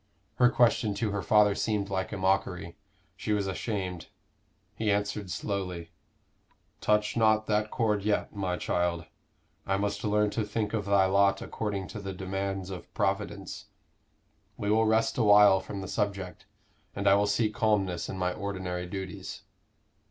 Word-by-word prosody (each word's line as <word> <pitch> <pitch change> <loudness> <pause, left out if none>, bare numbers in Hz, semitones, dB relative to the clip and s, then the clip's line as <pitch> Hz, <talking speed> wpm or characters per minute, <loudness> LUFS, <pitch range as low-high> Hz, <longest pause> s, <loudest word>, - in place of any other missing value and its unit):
Her 125 -1 +6
question 115 -3 +2
to 110 -1 -1
her 100 0 -2
father 105 0 +4
seemed 100 -2 -1
like 95 -1 -2
a 105 - -4
mockery; 95 -2 0 0.4
she 105 - -2
was 100 -1 0
ashamed. 95 -3 -3 0.7
He 110 -1 -2
answered 100 -1 -1
slowly 90 -4 -4 0.9
"Touch 105 0 +1
not 110 -2 +3
that 105 0 0
chord 105 -4 0
yet, 105 +1 -1
my 95 -3 -1
child. 85 -2 -1 0.6
I 95 - +1
must 100 +1 -2
learn 105 0 +2
to 110 - -1
think 105 0 -2
of 105 -3 -1
thy 100 -1 +4
lot 100 +1 +3
according 100 -4 -3
to 105 +2 -6
the 95 -1 -5
demands 95 0 -3
of 90 -2 -8
Providence. 100 0 -2 0.9
We 105 0 -1
will 110 +1 +3
rest 115 +2 +2
a - - +4
while 105 -2 +7
from 95 +1 -6
the 95 - -6
subject; 100 -4 -3 0.5
and 100 0 -1
I 100 - +7
will 100 +1 +3
seek 105 +1 +1
calmness 100 -6 0
in 95 - -5
my 90 -1 0
ordinary 95 -3 -4
duties." 95 -1 -6
100 Hz, 160 wpm, -29 LUFS, 95-105 Hz, 0.9 s, while